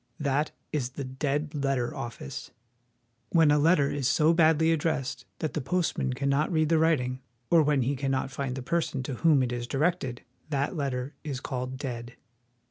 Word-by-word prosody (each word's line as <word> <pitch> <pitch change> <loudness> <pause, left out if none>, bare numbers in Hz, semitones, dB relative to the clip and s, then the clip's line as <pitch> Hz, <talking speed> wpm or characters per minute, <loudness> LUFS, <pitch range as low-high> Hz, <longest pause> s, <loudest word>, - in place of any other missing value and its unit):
That 145 +1 +1 0.2
is 130 -4 -1
the 140 - -4
dead 145 +3 -2
letter 135 -4 -1
office. 115 -13 -6 0.8
When 165 -3 +5
a 150 - +4
letter 145 -2 +4
is 140 -3 -1
so 155 +3 +4
badly 160 -1 +4
addressed 155 -4 -1
that 155 - -3
the 155 - -1
postman 165 -3 0
cannot 140 +4 +1
read 155 -2 +2
the 165 -1 +4
writing, 130 -6 +1 0.3
or 170 -2 +7
when 145 -3 +2
he 140 +4 0
cannot 135 0 -1
find 135 -2 -3
the 130 - -5
person 150 -3 -1
to 130 -1 -4
whom 155 -5 +5
it 125 - -1
is 120 0 -3
directed, 135 -3 -1 0.3
that 140 +4 -1
letter 135 -2 -2
is 140 -5 -3
called 130 0 -4
dead. 120 -3 -5
140 Hz, 175 wpm, -28 LUFS, 130-155 Hz, 0.8 s, or